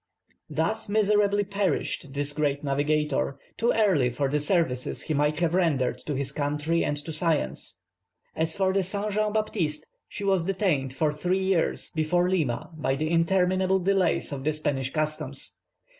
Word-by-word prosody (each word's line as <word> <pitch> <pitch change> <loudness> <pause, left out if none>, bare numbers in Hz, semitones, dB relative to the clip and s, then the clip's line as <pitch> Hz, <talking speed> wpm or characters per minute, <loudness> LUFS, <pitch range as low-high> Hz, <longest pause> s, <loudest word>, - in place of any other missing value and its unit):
Thus 215 +8 -1
miserably 205 -1 +3
perished 195 -7 -1
this 145 0 -1
great 145 -1 0
navigator, 145 0 0 0.2
too 235 +1 +2
early 185 - +3
for 135 +3 -1
the 150 +2 +1
services 145 -5 0
he 155 - -2
might 150 +1 +1
have 170 -1 +2
rendered 140 -9 +1
to 150 - -1
his 135 0 -2
country 150 +3 0
and 145 - -1
to 160 - -5
science. 155 - -1 0.6
As 160 0 -1
for 190 -1 +1
the 195 - +3
Saint 200 +3 -2
Jean 210 +1 +1
Baptiste, 200 -8 -1 0.2
she 205 - -6
was 190 -3 +2
detained 180 -9 0
"for 150 +3 0
three 180 +5 0
years" 190 -3 0
before 170 +3 +2
Lima 155 -6 -1
by 140 -3 0
the 155 +3 -2
interminable 185 +2 +2
delays 190 -3 +1
of 135 -2 -5
the 155 +2 +1
Spanish 135 -3 -1
customs. 155 +1 -3
160 Hz, 160 wpm, -26 LUFS, 145-190 Hz, 0.6 s, miserably